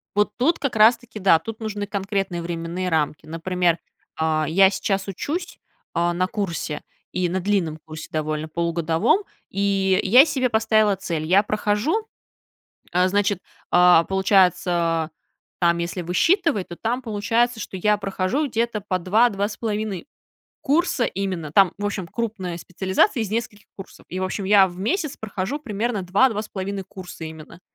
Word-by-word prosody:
Вот 210 Hz, 0 st, +3 dB
тут 300 Hz, +8 st, +2 dB
как 255 Hz, -6 st, -2 dB
раз 220 Hz, +3 st, +7 dB
таки, 230 Hz, -3 st, -11 dB
да, 185 Hz, -4 st, +5 dB
тут 225 Hz, +6 st, -7 dB
нужны 210 Hz, -2 st, -4 dB
конкретные 195 Hz, -3 st, -2 dB
временные 170 Hz, +2 st, -4 dB
рамки. 155 Hz, -1 st, -1 dB
Например, 170 Hz, +1 st, 0 dB, 0.4 s
а, 155 Hz, -1 st, +1 dB
я 190 Hz, +5 st, +5 dB
сейчас 195 Hz, 0 st, -2 dB
учусь, 325 Hz, -, -4 dB, 0.3 s
а, 175 Hz, +1 st, +1 dB
на 180 Hz, +1 st, +1 dB
курсе, 170 Hz, -7 st, -3 dB, 0.3 s
и 180 Hz, -1 st, 0 dB
на 185 Hz, +2 st, -2 dB
длинном 175 Hz, -5 st, 0 dB
курсе 155 Hz, -1 st, -8 dB
довольно, 155 Hz, 0 st, -2 dB
полугодовом, 170 Hz, -, +1 dB, 0.3 s
и 195 Hz, -1 st, +1 dB
я 250 Hz, +9 st, +7 dB
себе 260 Hz, -5 st, 0 dB
поставила 220 Hz, -2 st, +3 dB
цель. 165 Hz, -4 st, -3 dB
Я 190 Hz, +5 st, +4 dB
прохожу, 215 Hz, -, 0 dB, 0.9 s
а, 180 Hz, +1 st, +3 dB
значит, 205 Hz, 0 st, +1 dB, 0.3 s
а, 175 Hz, -1 st, +6 dB
получается, 180 Hz, -4 st, +2 dB, 0.5 s
там, 170 Hz, -1 st, +3 dB
если 170 Hz, +2 st, -3 dB
высчитывать, 280 Hz, -, +1 dB
то 175 Hz, -, -8 dB
там 240 Hz, +6 st, -2 dB
получается, 230 Hz, +1 st, 0 dB
что 195 Hz, -, -6 dB
я 210 Hz, +3 st, +2 dB
прохожу 200 Hz, +9 st, -1 dB
где-то 230 Hz, -2 st, -1 dB
по 185 Hz, -2 st, -2 dB
2-2,5 210 Hz, +1 st, 0 dB, 0.6 s
курса 295 Hz, -3 st, +1 dB
именно, 185 Hz, -6 st, -3 dB
там, 190 Hz, +2 st, +5 dB
в 205 Hz, -, -2 dB
общем, 195 Hz, -3 st, -3 dB
крупная 200 Hz, -4 st, -4 dB
специализация 190 Hz, -, +1 dB
из 210 Hz, -2 st, -4 dB
нескольких 220 Hz, -2 st, -3 dB
курсов, 195 Hz, -, -12 dB
и, 185 Hz, -, -4 dB
в 185 Hz, -, -1 dB
общем, 190 Hz, +1 st, -3 dB
я 195 Hz, -1 st, +6 dB
в 175 Hz, -, -11 dB
месяц 300 Hz, -, -1 dB
прохожу 220 Hz, +6 st, -4 dB
примерно 220 Hz, -5 st, -2 dB
2-2,5 200 Hz, -1 st, 0 dB
курса 185 Hz, -3 st, -10 dB
именно. 160 Hz, +1 st, -9 dB
195 Hz, 150 wpm, -23 LUFS, 175-220 Hz, 0.9 s, раз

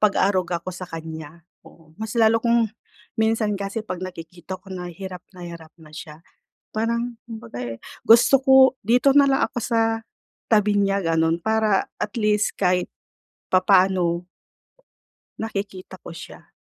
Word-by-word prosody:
pag-aaruga 185 Hz, -4 st, +1 dB
ko 185 Hz, -, -4 dB
sa 180 Hz, 0 st, -8 dB
kanya, 160 Hz, 0 st, -8 dB, 0.2 s
oo. 160 Hz, -2 st, -18 dB
Mas 220 Hz, +1 st, -5 dB
lalo 225 Hz, 0 st, +4 dB
kung, 235 Hz, -2 st, +2 dB, 0.5 s
minsan 220 Hz, -1 st, +1 dB
kasi 200 Hz, +3 st, -4 dB
pag 185 Hz, -4 st, -5 dB
nakikita 180 Hz, 0 st, -8 dB
ko 195 Hz, -, -17 dB
na 180 Hz, -1 st, -5 dB
hirap 185 Hz, 0 st, -8 dB, 0.2 s
na 180 Hz, -, -8 dB
hirap 170 Hz, -2 st, -10 dB
na 155 Hz, -2 st, -17 dB
siya, 155 Hz, +1 st, -10 dB, 0.5 s
parang 235 Hz, +2 st, -2 dB
kumbaga, 220 Hz, -, -9 dB, 0.2 s
eh, -, -, -25 dB, 0.3 s
gusto 235 Hz, +4 st, +7 dB
ko 265 Hz, 0 st, +3 dB, 0.3 s
dito 250 Hz, +4 st, +4 dB
na 280 Hz, -, +7 dB
lang 270 Hz, 0 st, +2 dB
ako -, -, -4 dB
sa, 230 Hz, 0 st, 0 dB, 0.7 s
tabi 210 Hz, -2 st, +3 dB
niya 200 Hz, -1 st, +2 dB
ganon 165 Hz, -2 st, +1 dB
para 220 Hz, +1 st, +1 dB
at 210 Hz, -, -4 dB
least 210 Hz, 0 st, +1 dB
kahit 180 Hz, -1 st, +1 dB, 0.6 s
papaano 185 Hz, -2 st, +3 dB, 1.2 s
nakikita 195 Hz, -4 st, -5 dB
ko -, -, -8 dB
siya. 165 Hz, -, -12 dB
195 Hz, 145 wpm, -23 LUFS, 170-220 Hz, 1.2 s, gusto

